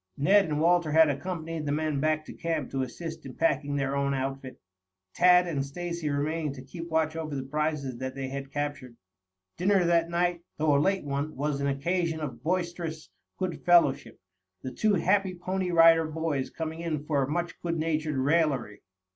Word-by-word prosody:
Ned 195 +8 +5
and 150 -3 -2
Walter 170 -1 +3
had 160 -1 +6
accompanied 160 +1 -4
the - - 0
men 155 -1 0
back 155 +1 0
to - - -9
camp 160 -5 -3
to 135 - -1
assist 160 +5 -6
in 130 -2 -9
packing 145 -3 +1
their 140 -1 -1
own 140 0 0
outfit, 135 0 -4 0.5
Tad 180 0 +6
and 150 -6 -1
Stacy 170 +2 -4
remaining 150 +1 -1
to 130 -2 -10
keep 165 +5 -8
watch 160 -1 +1
over 155 -3 -4
the 135 - -3
prizes 145 -2 -2
that 130 0 -4
they 135 -1 -4
had 135 0 -6
captured. 145 -5 -4 0.6
Dinner 190 0 +3
that 170 -1 +2
night, 175 0 0 0.2
though 150 -1 +3
a 140 - +4
late 195 +4 +1
one, 145 +2 -3
was 140 0 -2
an 140 - 0
occasion 160 +4 -1
of 130 -7 -6
boisterous 170 -1 -3 0.3
good 185 -2 -3
fellowship, 170 -6 +3 0.4
the 130 - -4
two 210 - +2
happy 190 +1 +1
Pony 185 +1 -2
Rider 165 -1 +6
Boys 155 -4 -2
coming 160 0 -5
in 155 -3 -3
for 140 -4 +1
much 170 +3 -3
good 170 -1 -2
natured 155 -2 -1
raillery. 135 -6 +1
155 Hz, 180 wpm, -28 LUFS, 140-170 Hz, 0.6 s, had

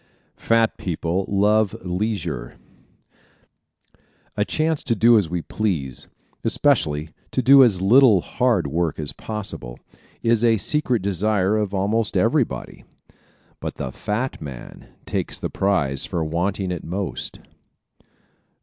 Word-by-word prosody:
Fat 115 -1 +1
People 90 +2 -2
Love 105 +1 +2
Leisure 90 - -3 1.4
¶ - - -36 0.4
A - - +1
chance 155 -1 -1
to 115 - 0
do 115 +3 +5
as 100 -7 +2
we 85 -1 -3
please, 80 - -3 0.4
especially 75 +1 +1 0.2
to 130 - -1
do 135 +2 +8
as 100 -7 +2
little 115 -2 +6
hard 120 - 0
work 80 +2 -1
as 75 -2 -2
possible, 100 - -6 0.5
is 115 -1 +2
a 115 -1 +4
secret 125 -2 +1
desire 100 +1 +1
of 105 -2 -1
almost 105 +2 0
everybody. - - 0 0.8
But - - -5
the 65 - -5
fat 110 - -3
man 70 -5 -9 0.2
takes - - -3
the - - -4
prize 70 -9 0
for 85 - -2
wanting 90 +4 -2
it 90 - -4
most. 95 +2 -5
100 Hz, 125 wpm, -22 LUFS, 85-115 Hz, 1.4 s, do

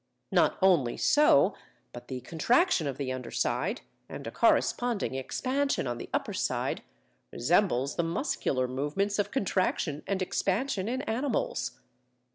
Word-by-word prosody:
Not - - +3
only 165 -11 +4
so, 295 - +5 0.4
but 120 - -10
the 130 -2 -5
contraction 170 - +2
of 135 -2 -4
the 130 -2 -2
under 125 -2 -6
side 165 - -1 0.3
and - - -7
a - - -5
corresponding 240 - +1
expansion 260 - -1
on 120 -1 -3
the - - -8
upper - - -1
side, - - -1 0.5
resembles 140 - +1
the 170 - +2
muscular 165 - -1
movements 150 +11 -1
of 205 0 +1
contraction 185 - 0
and 195 -1 0
expansion 195 +3 -1
in 260 +3 -2
animals. 240 +2 -2
180 Hz, 135 wpm, -29 LUFS, -, 0.5 s, so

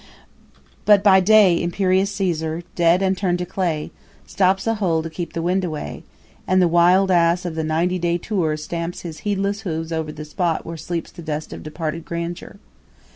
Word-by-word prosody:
But 205 -2 +5
by 195 -2 +7
day 195 -3 +5
imperious 185 +2 +1
Caesar, 165 -4 -2
dead 175 +2 +3
and 190 0 +2
turn'd 180 -2 0
to 180 - -3
clay, 170 -5 -2 0.3
stops 190 0 +1
a 225 - +2
hole 165 -4 +1
to 165 - -6
keep 170 +1 -6
the 165 - -3
wind 185 +2 +1
away; 155 -4 -5 0.5
and 185 0 +3
the 180 - +4
wild 180 +3 +4
ass 175 0 +3
of 175 - -3
the 160 0 -2
ninety 170 +4 0
day 170 0 +1
tour 175 -5 -1
stamps 170 +2 -5
his 165 -3 -7
heedless 200 0 -1
hoofs 165 -4 -4
over 160 -1 -2
the 150 0 -8
spot 165 +2 -1
where 165 - -6
sleeps 170 +1 -5
the - - -11
dust 155 -1 -5
of - - -8
departed 155 +1 -5
grandeur. 170 +2 -5
175 Hz, 185 wpm, -21 LUFS, 165-190 Hz, 0.5 s, by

